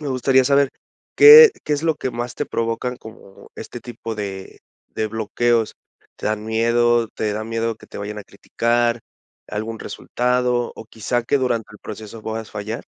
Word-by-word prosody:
¿Me 150 - -5
gustaría 130 0 +3
saber 140 0 +3 0.5
qué 455 +1 +11
qué 150 - -1
es 145 - -4
lo 160 -2 +2
que 130 - -3
más 120 +1 -5
te - - -3
provocan 115 +2 -2
como 110 -3 -14
este 120 - -8
tipo 115 -2 -7
de 95 -2 -7 0.3
de 110 - -3
bloqueos? 115 +1 0 0.4
¿Te - - -10
dan 105 0 -2
miedo? 115 +1 +2
¿Te 105 -1 -3
dan 110 +1 -5
miedo 115 -1 -1
que - - -17
te - - -10
vayan 105 +1 -5
a 100 - -9
criticar 120 +3 -1 0.5
algún 110 +2 -4
resultado? 125 -1 -1
¿O - - -9
quizá 115 +2 -2
que 140 - +2
durante 120 -4 -1
el 105 - -14
proceso 110 +1 -9
puedas 110 0 -5
fallar? 110 +2 -5
115 Hz, 175 wpm, -21 LUFS, 110-125 Hz, 0.5 s, qué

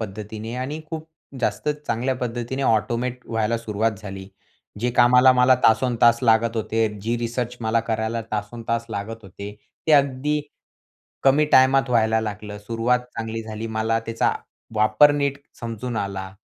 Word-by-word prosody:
पद्धतीने 110 +2 -6
आणि 140 +5 -4
खूप 160 -1 -6 0.3
जास्त 140 - -1 0.2
चांगल्या 125 +4 0
पद्धतीने 120 +3 -3
ऑटोमेट 120 +2 0
व्हायला 115 0 0
सुरुवात 110 0 -1
झाली. 95 -2 -8 0.5
जे 125 +2 +1
कामाला 125 +1 +7
मला 125 0 +5
तासनतास 115 0 +4
लागत 115 0 +3
होते. 110 0 0
जी 115 +3 -1
रिसर्च 120 +1 -3
मला 110 +1 +1
करायला 110 +1 -1
तासनतास 115 +2 -3
लागत 110 +2 -5
होते, 100 +2 -9 0.3
ते 155 - +3
अगदी 140 +1 +2 0.8
कमी 140 +3 +4
टायमात 130 0 +5
व्हायला 110 -2 +3
लागलं. 105 -1 -6
सुरुवात 115 +4 0 0.2
चांगली 115 0 -4
झाली. 110 0 -6
मला 110 0 0
त्याचा 115 0 +1 0.4
वापर 110 +7 +5
नीट 140 -1 -1 0.2
समजून 115 +1 -5
आला 95 -2 -4
115 Hz, 140 wpm, -23 LUFS, 110-125 Hz, 0.8 s, कामाला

